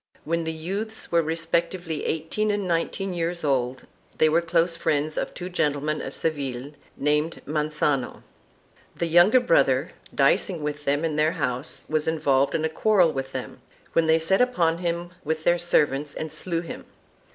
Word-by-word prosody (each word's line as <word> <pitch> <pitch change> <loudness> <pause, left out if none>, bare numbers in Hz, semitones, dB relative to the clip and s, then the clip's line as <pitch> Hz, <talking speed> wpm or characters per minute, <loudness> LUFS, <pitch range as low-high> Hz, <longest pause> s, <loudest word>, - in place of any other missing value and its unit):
When 170 +1 -1
the 160 - -1
youths 195 +8 -5
were 170 -1 +4
re 160 0 -2
spectively 165 -1 -1
eighteen 160 +7 -1
and 205 -2 -1
nineteen 180 +3 -1
years 170 0 -2
old 130 -3 0 0.3
they 155 - +4
were 165 +2 +3
close 170 0 +2
friends 155 -2 0
of - - -2
two 180 - -5
gentlemen 155 -3 -1
of - - -6
Seville 140 -4 -3 0.3
named 150 +3 0
Mangano. 150 -3 -1 0.7
The 170 - -1
younger 175 +9 +6
brother, - - +2 0.2
dicing 175 -6 +2
with 150 0 -4
them 145 +3 +1
in 155 -2 -1
their 155 +1 +3
house, 125 +3 -3
was 155 0 0
involved 140 -4 +2
in 160 - 0
a - - +3
quarrel 180 0 +3
with 135 0 -4
them, 130 -1 -6 0.3
when 165 -1 +3
they 160 0 +5
set 175 +6 +2
upon 170 -10 +2
him 175 0 -2
with 155 +1 -2
their 175 +1 +3
servants 145 -4 +1
and 160 -1 -5
slew 170 -2 -2
him. 170 - -8
160 Hz, 170 wpm, -25 LUFS, 150-175 Hz, 0.7 s, younger